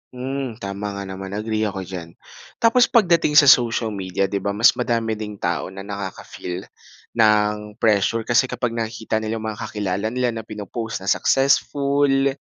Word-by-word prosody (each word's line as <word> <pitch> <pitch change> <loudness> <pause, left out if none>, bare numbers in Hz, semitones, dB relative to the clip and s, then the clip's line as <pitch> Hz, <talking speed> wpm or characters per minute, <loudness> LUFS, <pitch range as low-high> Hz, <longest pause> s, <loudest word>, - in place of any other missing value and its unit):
Hmm, 130 -1 -4
tama 100 +1 -4
nga 100 - -5
naman 95 +1 -7
agree 110 0 -1
ako 95 -1 -4
diyan. 85 -3 -8 0.5
Tapos 235 +2 +5
pagdating 170 -9 +3
sa 150 - +9
social 120 -4 +4
media, 95 -1 -2
'di 100 +1 -1
ba 100 +1 -2
mas 115 +4 +6
madami 115 -2 -1
ding 105 -1 -5
tao 85 -3 -2
na 95 +1 -9
nakaka-feel 95 -2 -6 0.5
ng 105 -1 +2
pressure 110 +1 +2
kasi 120 +3 +3
kapag 120 -2 -2
nakikita 110 -1 -2
nila 110 +1 -3
yung 110 - -5
mga 105 - -10
kakilala 100 0 -2
nila 125 +1 0
na 110 -1 -7
pino-post 105 0 -5
na 95 - +1
successful, 140 0 +2
110 Hz, 165 wpm, -22 LUFS, 100-120 Hz, 0.5 s, sa